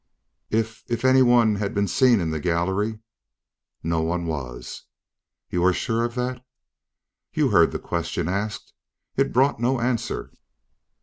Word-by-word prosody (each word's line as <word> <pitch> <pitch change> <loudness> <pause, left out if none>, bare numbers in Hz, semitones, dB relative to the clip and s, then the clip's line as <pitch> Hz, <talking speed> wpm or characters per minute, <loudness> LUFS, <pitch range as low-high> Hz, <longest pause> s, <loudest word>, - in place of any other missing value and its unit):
"If 110 +1 -1
if 120 +1 -1
anyone 120 -4 +5
had 100 -1 -3
been 100 0 +1
seen 125 +3 +4
in 80 -2 -1
the 80 - -2
gallery 95 +7 0 0.4
" - - -57
"No 80 - +1
one 85 +2 -1
was." 60 -6 -6 0.7
"You 90 -1 0
are 95 0 +5
sure 115 +2 -1
of 120 0 -5
that?" 125 0 -3 0.9
"You - - +2
heard - - +5
the - - -2
question 85 0 -3
asked. 100 +3 -3 0.4
It - - +1
brought 130 0 +3
no 125 +2 +1
answer." 120 -1 -2
105 Hz, 145 wpm, -24 LUFS, 85-120 Hz, 0.9 s, anyone